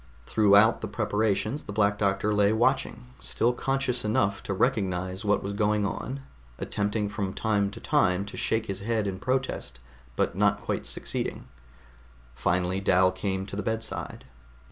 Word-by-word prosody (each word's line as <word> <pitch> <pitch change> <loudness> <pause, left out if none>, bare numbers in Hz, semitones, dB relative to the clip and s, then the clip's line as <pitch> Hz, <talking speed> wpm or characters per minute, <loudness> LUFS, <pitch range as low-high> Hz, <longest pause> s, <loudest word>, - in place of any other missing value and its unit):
Throughout 105 +1 +5
the 110 - -3
preparations 110 +4 -1
the - - -6
Black 100 -1 +2
Doctor 100 +1 +1
lay 105 0 +4
watching, 120 +1 +1
still 120 +2 0
conscious 135 -1 -1
enough 100 -2 +1
to - - -5
recognize 95 -3 0
what 105 -1 +1
was 100 - -3
going 105 0 +1
on, 135 +6 -4 0.4
attempting 105 +1 -1
from 100 -2 -3
time 105 -3 +1
to 100 - -10
time 90 +2 +2
to 100 - -9
shake 110 0 0
his 100 -3 -4
head 110 +1 -1
in 95 -2 -3
protest 130 - -2 0.4
but - - 0
not - - +2
quite - - -3
succeeding. - - -3 0.9
Finally 90 +8 0
Dal 95 -1 +4
came 95 0 -2
to 100 - -7
the 105 - -2
bedside. 110 +2 -4
105 Hz, 155 wpm, -27 LUFS, 100-110 Hz, 0.9 s, Throughout